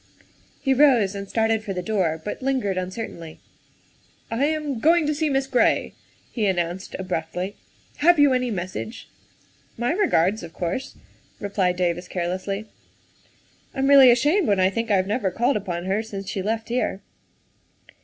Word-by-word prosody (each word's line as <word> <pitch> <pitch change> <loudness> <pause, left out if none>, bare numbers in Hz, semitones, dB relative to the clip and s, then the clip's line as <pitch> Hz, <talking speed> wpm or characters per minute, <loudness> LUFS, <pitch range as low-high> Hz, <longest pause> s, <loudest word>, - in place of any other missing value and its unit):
He 270 - +1
rose 250 -8 +4
and 200 -1 -7
started 225 -1 +1
for 200 -2 -4
the 180 -1 -4
door, 180 -6 0
but 210 - -5
lingered 255 -7 0
uncer 185 +5 -3
tainly. 165 -2 -11 0.5
" - - -35
I 235 +5 +1
am 300 -4 -2
going 325 +4 +4
to 300 - +1
see 305 +1 0
Miss 270 -1 +1
Gray," 260 -2 +1 0.4
he 220 -4 0
announced 175 0 -2
abruptly. 180 +1 -4
' - - -34
' - - -32
Have 345 +3 +5
you 285 -2 +6
any 250 -1 0
message? 185 +3 -5 0.2
' - - -35
' - - -35
" - - -35
My 240 +4 0
regards, 220 - +2
of 165 -2 -10
course," 180 +9 -4 0.4
replied 195 -3 0
David 175 0 -1
carelessly. 185 +4 -3 1.1
"I'm 270 - 0
really 275 -2 +8
ashamed 295 +10 +3
when 200 -2 +2
I 185 +1 +3
think 230 +3 -3
I 205 - +4
have 185 - +1
never 205 0 0
called 240 +9 +1
upon 180 -4 -3
her 195 +3 0
since 200 -3 -7
she 195 - -3
left 225 +3 -2
here. 235 -5 -1
210 Hz, 180 wpm, -23 LUFS, 185-260 Hz, 1.1 s, really